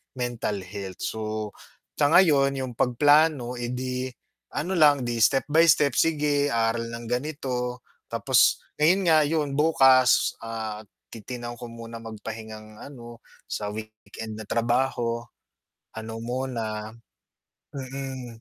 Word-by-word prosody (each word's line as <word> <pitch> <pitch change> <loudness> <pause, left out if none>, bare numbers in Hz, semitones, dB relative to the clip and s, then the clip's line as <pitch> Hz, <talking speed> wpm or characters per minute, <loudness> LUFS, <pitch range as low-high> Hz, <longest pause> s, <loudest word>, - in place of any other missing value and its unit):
mental 120 -5 -2
health 95 0 -8
so, 110 - -3 0.8
sa 145 0 +4
ngayon 140 -6 +5
yung - - -7
pag-plano, 145 +1 +3
eh, 120 - -3
di 125 0 -3 0.5
ano 185 +5 -1
lang 145 -5 +5
'di 120 -1 -2
step 135 +5 +3
by 160 +2 +6
step, 140 -3 +2
sige 145 -3 +2
aral 115 0 +1
ng 115 0 -7
ganito, 125 -1 -3 0.3
tapos - - +3 0.2
ngayon 175 +6 +4
nga 160 -1 +6
yun 145 -2 -1
bukas, 135 -4 +4
ah, 110 -1 -5 0.3
titingnan 120 +1 -7
ko 120 0 -8
muna 115 0 -9
mag-pahingang 110 -1 -9
ano, 120 -4 -11 0.2
sa 105 -1 -3
weekend 110 0 -8
na - - -6
trabaho, 120 0 0 0.7
ano 110 0 -6
muna, 115 -3 -4 0.8
mm, 130 -3 -6
125 Hz, 120 wpm, -25 LUFS, 115-140 Hz, 0.8 s, by